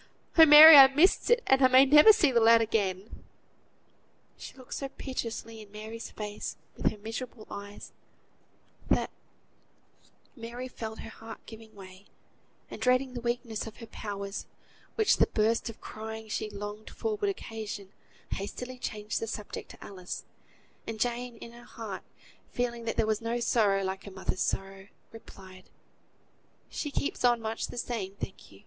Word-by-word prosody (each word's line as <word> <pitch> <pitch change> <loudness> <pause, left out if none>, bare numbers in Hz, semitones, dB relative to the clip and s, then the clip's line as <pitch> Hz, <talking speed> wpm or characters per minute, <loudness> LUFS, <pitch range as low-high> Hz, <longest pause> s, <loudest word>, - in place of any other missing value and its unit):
Oh! 320 -1 +9
Mary, 300 +1 +12
I 270 -1 +11
missed 300 +8 +3
it; 480 0 +4
and 265 0 +3
I 260 - +7
may 260 +1 +7
never 300 +9 +8
see 320 -9 +3
the 240 - +3
lad 230 0 +6
again." 205 -3 -2 1.1
She - - -11
looked 255 -2 -11
so 275 - -4
piteously 230 -4 -6
in 205 -1 -15
Mary's 220 +2 -8
face 210 -1 -6 0.2
with - - +1
her 215 - -9
miserable 225 +2 -7
eyes, 205 0 -9 1.0
that - - +1 1.2
Mary 240 +1 -7
felt 220 -3 -7
her 225 - -9
heart 225 +1 -11
giving 220 -1 -13
way, 190 0 -13 0.6
and, - - -8
dreading 255 +1 +2
the 240 - -5
weakening 235 -1 -3
of 220 - -10
her 230 - -9
powers, 200 -2 -6 0.5
which 435 -2 +3
the - - +4
burst 225 +2 0
of 225 - -11
crying 220 0 -8
she 215 - -3
longed 205 +1 -8
for 445 -1 -3
would 410 -1 0
occasion, 220 - -6 0.4
hastily 250 +6 -6
changed 210 -3 -4
the 225 - -4
subject 210 -1 -6
to - - -13
Alice; 185 -2 -7 0.6
and 225 -1 -5
Jane, 245 0 -2
in 230 - -10
her 240 0 -14
heart, 220 -5 -8 0.5
feeling 235 -1 -3
that 225 - -2
there - - +2
was 215 0 -1
no 230 +1 -2
sorrow 205 -5 +2
like 190 +1 -4
a - - -6
mother's 190 -1 -4
sorrow, 195 +1 -3 0.2
replied, 190 -4 -14 1.0
"She 295 - -4
keeps 280 - -3
on 240 -1 +4
much 220 0 -4
the - - -10
same, 215 -5 -4
thank 190 - -8
you. 100 - -16
225 Hz, 165 wpm, -29 LUFS, 205-250 Hz, 1.2 s, Mary